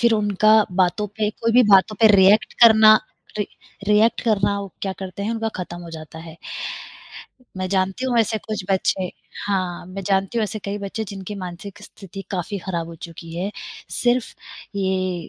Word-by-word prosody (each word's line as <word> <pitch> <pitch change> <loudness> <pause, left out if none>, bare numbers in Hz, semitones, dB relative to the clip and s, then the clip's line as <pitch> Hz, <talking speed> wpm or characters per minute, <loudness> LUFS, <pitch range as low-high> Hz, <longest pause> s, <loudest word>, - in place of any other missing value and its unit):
फिर 235 -1 +4
उनका 210 0 +3 0.2
बातों 185 +3 +1
पे 210 -1 0
कोई 230 +1 -1
भी 250 +1 +7
बातों 195 +2 +5
पे 225 - +8
रिएक्ट 195 +3 +5
करना, 220 -1 +9 0.4
रि 210 - 0 0.4
रिएक्ट 215 +2 +4
करना, 205 -3 +1
वो 195 -3 -8
क्या 195 -1 -1
करते 190 0 -6
हैं, 210 - -1
उनका 225 -1 -1
ख़त्म 175 0 -8
हो 170 - -9
जाता 160 0 -9
है। 165 0 -11 1.2
मैं 185 0 -3
जानती 195 +6 0
हूँ 245 -2 +1
ऐसे 220 0 +1
कुछ 210 -3 -5
बच्चे 190 -1 0 0.4
हाँ, 185 -4 -2
मैं 195 +2 -7
जानती 195 +3 0
हूँ - - +1
ऐसे 215 +2 -4
कई 200 +1 -3
बच्चे 200 +2 -4
जिनकी 195 +1 -7
मानसिक 185 +3 -8
स्थिति 195 -1 -10
काफ़ी 195 +2 -3
ख़राब 170 -3 -4
हो 165 - -9
चुकी 165 0 -10
है, 185 +4 -2 0.4
सिर्फ़ 245 0 0 0.4
ये 185 -3 -1
195 Hz, 175 wpm, -22 LUFS, 185-215 Hz, 1.2 s, करना